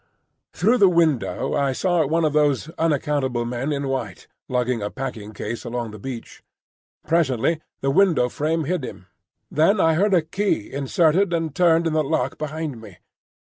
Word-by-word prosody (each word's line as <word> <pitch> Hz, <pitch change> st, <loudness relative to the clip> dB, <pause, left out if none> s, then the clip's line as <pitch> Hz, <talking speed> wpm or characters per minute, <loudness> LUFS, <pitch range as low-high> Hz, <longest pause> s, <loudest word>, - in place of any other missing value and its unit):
Through 225 Hz, +8 st, +2 dB
the 195 Hz, -, +7 dB
window 165 Hz, -7 st, +1 dB
I 140 Hz, -2 st, +1 dB
saw 175 Hz, +3 st, +1 dB
one 165 Hz, +2 st, +1 dB
of 150 Hz, -, 0 dB
those 150 Hz, -1 st, +2 dB
unaccountable 145 Hz, -6 st, 0 dB
men 125 Hz, +5 st, -3 dB
in 140 Hz, -1 st, -2 dB
white, 125 Hz, -8 st, -4 dB, 0.2 s
lugging 125 Hz, -2 st, 0 dB
a 105 Hz, -, -2 dB
packing 110 Hz, -5 st, -6 dB
case 110 Hz, +2 st, -5 dB
along 120 Hz, -2 st, -4 dB
the 105 Hz, -, -10 dB
beach. 125 Hz, +1 st, -8 dB, 0.7 s
Presently 160 Hz, -1 st, +1 dB, 0.2 s
the 135 Hz, -, +1 dB
window 165 Hz, -6 st, +3 dB
frame 155 Hz, +5 st, -1 dB
hid 170 Hz, 0 st, -2 dB
him. 95 Hz, -, -8 dB, 0.5 s
Then 165 Hz, +7 st, +3 dB
I 160 Hz, -2 st, +4 dB
heard 195 Hz, +4 st, +3 dB
a 170 Hz, -, +3 dB
key 165 Hz, -, -2 dB
inserted 165 Hz, +6 st, +2 dB
and 165 Hz, -3 st, -1 dB
turned 170 Hz, 0 st, +3 dB
in 165 Hz, -, 0 dB
the 155 Hz, 0 st, +2 dB
lock 135 Hz, -3 st, -1 dB
behind 155 Hz, -4 st, -4 dB
me. 100 Hz, -5 st, -13 dB
150 Hz, 170 wpm, -22 LUFS, 125-165 Hz, 0.7 s, the